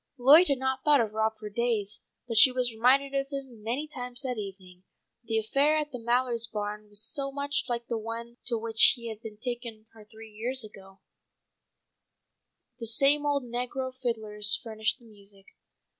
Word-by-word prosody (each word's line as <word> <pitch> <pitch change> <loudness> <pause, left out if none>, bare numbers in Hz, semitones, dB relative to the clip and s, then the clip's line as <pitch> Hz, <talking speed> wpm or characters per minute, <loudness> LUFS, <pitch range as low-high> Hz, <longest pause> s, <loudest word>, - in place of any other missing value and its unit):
Lloyd 290 +8 +7
had 280 - +1
not 265 0 -2
thought 295 -2 +5
of 220 -2 -1
Rob 220 0 0
for 215 -1 -8
days, 215 -1 -2 0.3
but 230 - -4
she 255 +4 +9
was 250 -1 0
reminded 265 +5 +3
of 275 0 -1
him 265 -6 -7
many 245 +8 -3
times 250 -3 -7
that 250 -4 -3
evening, 190 -3 -9 0.4
the 225 0 -1
affair 275 +8 +2
at 300 -1 -3
the 250 - -6
Mallards' 235 0 0
barn 210 0 -5
was 205 0 -3
so 275 +3 -1
much 280 0 -2
like 235 -1 -2
the 230 -1 -3
one 230 +2 -7
to 235 -2 0
which 225 0 +6
he 235 -2 -7
had 220 -2 -7 0.2
taken 235 -2 -6
her 220 -1 -15
three 220 +1 -14
years 240 +4 -2
before. 195 0 -16 1.8
The 230 - -4
same 280 +6 +3
old 285 -2 0
negro 250 +2 -4
fiddlers 215 -4 +2
furnished 220 -2 -1
the 240 - -21
music. 200 -2 -10
235 Hz, 175 wpm, -28 LUFS, 220-265 Hz, 1.8 s, she